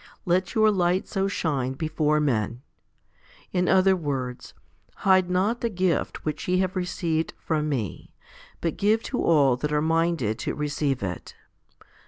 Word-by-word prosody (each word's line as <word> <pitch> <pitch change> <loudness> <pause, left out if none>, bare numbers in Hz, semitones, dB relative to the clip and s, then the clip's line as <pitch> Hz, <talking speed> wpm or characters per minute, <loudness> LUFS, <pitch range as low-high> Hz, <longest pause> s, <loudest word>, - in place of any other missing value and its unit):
2 175 - -2
Let 185 +1 +1
your 215 -1 +5
light 180 -1 +1
so 195 0 -1
shine 140 -9 -1
before 155 +1 0
men. 120 -3 -1 0.9
In 180 -1 +1
other 190 0 +5
words, 135 -7 -4 0.4
Hide 185 -2 +3
not 195 +6 +1
the 235 - 0
gift 185 -4 -1
which 155 - -3
ye 180 0 +2
have 185 +1 0
received 170 -3 -2
from 155 -2 -1
Me, 115 - -4 0.5
but 165 - -2
give 215 +3 +2
to 250 - -2
all 140 -6 +4
that 150 +3 -3
are 150 - +2
minded 160 -8 0
to - - -3
receive 145 -4 -1
it. 90 -3 -5
165 Hz, 155 wpm, -25 LUFS, 145-185 Hz, 0.9 s, your